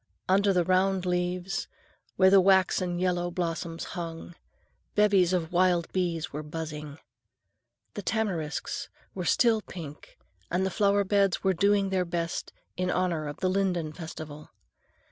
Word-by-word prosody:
Under 200 +2 +4
the 180 -2 +3
round 185 +1 +2
leaves, 180 +1 -1 0.5
where 190 0 +5
the 195 -1 +7
waxen 185 -1 +3
yellow 175 -1 0
blossoms 170 -1 -3
hung, 170 -1 -6 0.6
bevies 200 -4 +4
of 175 -2 -1
wild 175 -1 +2
bees 175 -4 -1
were 150 - -3
buzzing. 150 -1 -6 1.0
The 205 - -5
tamarisks 185 -8 -2 0.2
were - - -4
still 230 -3 +3
pink, 155 -7 -10 0.3
and 180 +2 0
the 190 - -1
flower 200 +1 +3
beds 195 -1 +2
were 190 -1 +3
doing 200 +1 +2
their 185 -1 +2
best 170 -1 -3 0.2
in 180 0 -1
honor 170 -4 0
of 145 - -7
the 185 - +2
linden 180 -5 0
festival. 155 -2 -8
180 Hz, 140 wpm, -28 LUFS, 165-190 Hz, 1.0 s, the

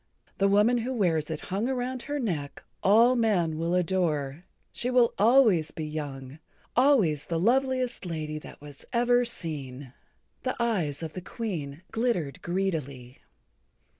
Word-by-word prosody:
The 195 - +4
woman 210 +5 +4
who 255 +3 -3
wears 165 -8 +1
it 160 -2 -4
hung 205 +6 0
around 255 -1 -2
her 290 +2 -3
neck 160 - -3 0.2
all 230 +5 +5
men 180 -9 +1
will 170 +2 0
adore. 165 -4 0 0.3
She 245 - -3
will 250 -2 +4
always 215 - +5
be 160 - -5
young, 145 -2 -6 0.4
always 230 - +3
the 165 -1 -2
loveliest 255 +4 +1
lady 155 -2 -4
that - - -12
was 145 -1 -11
ever 245 +1 +3
seen." 140 - -6 0.5
The 255 - -2
eyes 175 -11 0
of 160 -1 -5
the 185 - -6
Queen 170 -8 -5
glittered 185 - -1
greedily. 150 -9 -3
180 Hz, 140 wpm, -27 LUFS, 155-235 Hz, 0.5 s, all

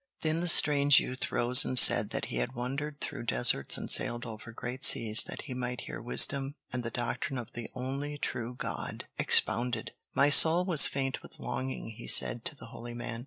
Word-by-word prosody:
Then 160 +1 -2
the 175 - -4
strange 145 -4 +4
youth 130 0 -6
rose 125 +2 +5
and 130 - -3
said - - +6
that - - -5
he 65 - -6
had - - -4
wandered 140 +4 -6
through 140 -4 -7
deserts 115 - +2
and - - -8
sailed 120 +1 0
over 115 0 -11
great 125 +3 -8
seas 110 0 +5
that - - -9
he 130 - -9
might 125 0 -6
hear - - -9
wisdom 135 +4 0 0.2
and 125 -1 -4
the 115 - -5
doctrine 120 +3 -5
of 120 -1 -9
the 120 -1 -8
only 135 +3 -5
true 120 -3 -6
God - - -7
expounded. 120 -2 +2 0.2
"My 140 +1 +2
soul 165 +5 +5
was 170 -6 +7
faint 135 -1 -5
with - - -13
longing," 130 -3 -6
he 115 +2 -12
said 115 - +1
to 165 - -4
the - - -14
holy 120 0 -10
man. 115 -1 -7
125 Hz, 200 wpm, -28 LUFS, 120-140 Hz, 0.2 s, was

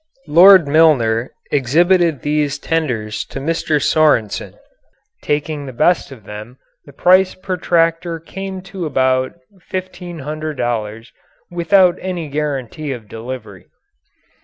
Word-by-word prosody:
Lord 175 +1 +7
Milner 135 -7 +3 0.2
exhibited 165 +3 +2
these 150 -1 0
tenders 125 -10 -2
to - - -7
Mr. 155 +1 0
Sorensen. 145 -8 +1 0.7
Taking 150 -1 -2
the 130 - -7
best 155 +5 +1
of 125 -6 -12
them 105 +5 -10 0.3
the - - -12
price 185 +6 +3
per 185 0 -4
tractor 165 -1 0
came 190 +3 -7
to 190 -3 -5
about 130 -2 +1 0.4
$1,500 150 - -4 0.4
without 175 +1 +3
any 175 -5 -4
guarantee 145 -1 -3
of 120 -5 -7
delivery. 115 -3 -8
150 Hz, 110 wpm, -18 LUFS, 130-175 Hz, 0.7 s, Lord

